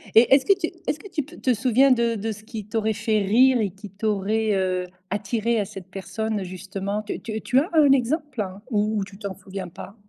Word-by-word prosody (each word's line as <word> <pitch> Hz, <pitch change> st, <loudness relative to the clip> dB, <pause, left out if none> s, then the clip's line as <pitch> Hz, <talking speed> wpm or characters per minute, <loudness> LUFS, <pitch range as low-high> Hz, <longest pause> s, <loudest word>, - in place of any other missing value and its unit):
Et 235 Hz, +3 st, +7 dB
est-ce 270 Hz, -1 st, +5 dB
que 395 Hz, -, +6 dB
tu 330 Hz, -4 st, -1 dB, 0.2 s
est-ce 300 Hz, -, 0 dB
que 405 Hz, -, -10 dB
tu 305 Hz, -5 st, -2 dB
p 320 Hz, +5 st, -14 dB
te 255 Hz, -, +2 dB
souviens 255 Hz, +4 st, +4 dB
de 235 Hz, -2 st, +3 dB
de 220 Hz, +2 st, -2 dB
ce 215 Hz, 0 st, -9 dB
qui 215 Hz, -2 st, -7 dB
t'aurait 220 Hz, 0 st, 0 dB
fait 220 Hz, 0 st, +1 dB
rire 250 Hz, +5 st, +5 dB
et 200 Hz, -4 st, 0 dB
qui 195 Hz, +1 st, -11 dB
t'aurait, 210 Hz, +1 st, 0 dB
heu, 185 Hz, -1 st, 0 dB, 0.2 s
attiré 220 Hz, +3 st, 0 dB
à 205 Hz, -, 0 dB
cette 190 Hz, -2 st, -10 dB
personne 210 Hz, +2 st, -3 dB
justement? 195 Hz, +3 st, -4 dB
Tu 210 Hz, -, -4 dB
tu 220 Hz, 0 st, -5 dB
tu 255 Hz, -, +3 dB
as 310 Hz, -, -1 dB
un 295 Hz, -4 st, +6 dB
exemple? 270 Hz, -, +1 dB, 0.2 s
Ou 210 Hz, -1 st, +1 dB
tu 195 Hz, 0 st, -13 dB
t'en 200 Hz, -2 st, -5 dB
souviens 190 Hz, -1 st, -7 dB
pas? 195 Hz, +4 st, -10 dB
215 Hz, 220 wpm, -24 LUFS, 200-245 Hz, 0.2 s, Et